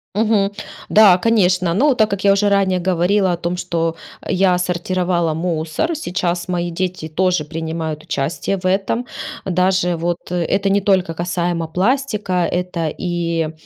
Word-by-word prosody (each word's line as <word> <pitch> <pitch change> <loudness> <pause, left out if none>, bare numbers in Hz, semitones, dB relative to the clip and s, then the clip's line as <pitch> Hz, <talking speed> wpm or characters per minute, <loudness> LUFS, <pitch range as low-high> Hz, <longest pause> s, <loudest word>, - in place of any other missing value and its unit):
Мгм. 210 -2 +2 0.4
Да, 205 -4 +7
конечно, 185 -5 +2
ну, 275 +7 +3
так 215 -3 +3
как 200 -1 -3
я 200 - +6
уже 200 +1 +2
ранее 195 -2 +2
говорила 185 +2 +2
о - - 0
том, 170 +1 -3
что 165 -2 -1 0.3
я 185 -1 +3
сортировала 180 -2 0
мусор, 165 - -1
сейчас 175 - -2
мои 175 -1 -1
дети 180 -1 -3
тоже 180 0 +1
принимают 160 0 -4
участие 155 +7 -2
в 180 - -14
этом. 195 +6 0 0.4
Даже 185 -1 +1
вот 170 +1 -1
это 195 +3 0
не 200 +1 +3
только 185 -4 +1
касаемо 175 -1 -2
пластика, 210 - 0 0.2
это 180 -2 -2
и, 170 -1 -2
180 Hz, 145 wpm, -19 LUFS, 170-195 Hz, 0.4 s, Да